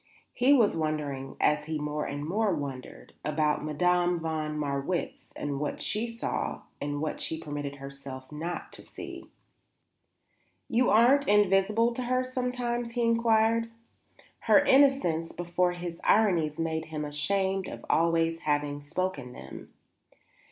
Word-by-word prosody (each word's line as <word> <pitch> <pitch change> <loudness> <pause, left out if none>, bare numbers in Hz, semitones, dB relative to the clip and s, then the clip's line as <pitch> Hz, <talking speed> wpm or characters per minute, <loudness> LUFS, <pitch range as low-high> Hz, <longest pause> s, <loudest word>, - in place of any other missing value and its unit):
He 255 +3 +3
was 240 -7 +5
wondering, 150 -4 -3
as 150 0 +2
he 155 0 -2
more 150 0 -2
and 145 +1 -4
more 210 +4 +1
wondered, 135 -3 -7
about 150 0 0
Madame 175 +4 +2
von 155 -2 -3
Marwitz, 145 +4 -3
and 145 -1 -3
what 150 - -3
she 225 +3 -1
saw 230 - -3 0.2
and 145 0 -2
what 155 - -3
she 160 - -2
permitted 145 -2 -5
herself 140 -1 -9
not 165 +4 -5
to - - -11
see. - - -9 1.4
"You 245 +2 +2
aren't 260 +6 +5
invisible 210 +3 +3
to 255 - -4
her 255 +1 +1
sometimes?" 250 -2 -2
he 240 0 0
inquired. 230 0 +3 0.7
Her - - +4
innocence 265 - +4
before 175 +1 0
his 175 -1 -6
ironies 175 -9 +3
made 160 -1 -2
him 155 -1 -4
ashamed 190 +6 -1 0.2
always 165 0 +2
of - - -21
having 145 -1 -1
spoken 145 -4 -3
them. - - -10
165 Hz, 135 wpm, -28 LUFS, 150-220 Hz, 1.4 s, was